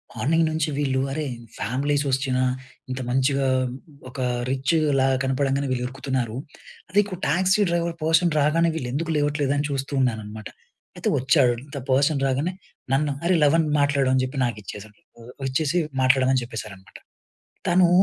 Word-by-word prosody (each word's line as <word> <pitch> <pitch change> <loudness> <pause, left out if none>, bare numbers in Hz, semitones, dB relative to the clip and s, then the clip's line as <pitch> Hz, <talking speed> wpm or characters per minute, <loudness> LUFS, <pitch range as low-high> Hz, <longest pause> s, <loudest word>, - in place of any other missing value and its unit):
Morning 165 +4 +2
నుంచి 155 -1 0
వీళ్ళు, 135 -2 +1
అరే! 155 +1 -2 0.3
ఫ్యామిలీస్ 140 +5 0
వచ్చినా, 130 -1 0 0.5
ఇంత 130 +1 -3
మంచిగా 135 +2 +2 0.6
ఒక 130 - -9 0.3
రిచ్‌ల 140 +1 +1 0.2
కనపడంగానే 135 +1 0
వీళ్ళు 125 -1 -1
ఉరుకుతున్నారు. 130 -3 -3 0.5
అదే 200 - +3
ఇకు 195 -2 -6
టాక్సీ 185 +6 +3
డ్రైవర్ 170 0 0
పర్సన్ 165 +1 +3
రాగానే 165 +3 +3
వీళ్ళు 125 -6 -4
ఎందుకు 165 +4 -2
లేవట్లేదు, 145 -1 +1
అని 145 - 0
చూస్తూ 135 +1 -3
ఉన్నాననమాట. 110 -3 -3 0.5
అయితే, - - -1
వచ్చాడు, 130 -2 +3 0.2
ద - - -3
పర్సన్ 140 +2 +3
రాగానే 140 +7 0 0.4
నన్ను, 145 +2 +2
"అరే! 180 +1 +3
లవన్ 160 +3 +4 0.2
మాట్లాడు," 140 -2 +2
అని 130 - +3
చెప్పి 130 +2 -7
నాకు 120 -3 -3
ఇచ్చేసాడు. 105 +2 -9 0.5
ఇచ్చేసి, 150 +5 0 0.3
మాట్లాడమని 130 0 +3
చెప్పేశారన్నమాట. 105 -5 -9 0.7
తనూ, 175 +1 +5
140 Hz, 140 wpm, -24 LUFS, 130-155 Hz, 0.7 s, తనూ